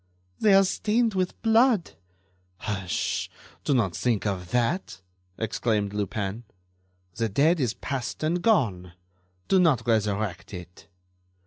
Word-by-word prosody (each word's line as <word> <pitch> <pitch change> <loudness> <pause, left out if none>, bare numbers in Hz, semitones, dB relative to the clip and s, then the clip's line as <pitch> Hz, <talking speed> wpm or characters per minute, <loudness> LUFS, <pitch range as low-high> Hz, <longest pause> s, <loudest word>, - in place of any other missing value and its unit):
"They 205 -3 +5
are 195 - +7
stained 220 +4 +1
with 185 -1 -2
blood." 225 -3 +4 0.7
"Hush! 95 -3 -2 0.3
Do 145 - +1
not 100 -9 +1
think 115 -1 0
of 90 -4 -2
that!" 120 - -1 0.4
exclaimed 105 -2 -1
Lupin. 105 +2 -3 0.7
"The 115 +2 -1
dead 155 - +3
is 125 -5 0
past 135 +1 -4
and 170 +3 0
gone. 105 - +1 0.5
Do 190 - +4
not 145 -11 +3
resurrect 105 -5 -1
it." 90 0 -11
115 Hz, 120 wpm, -26 LUFS, -, 0.7 s, are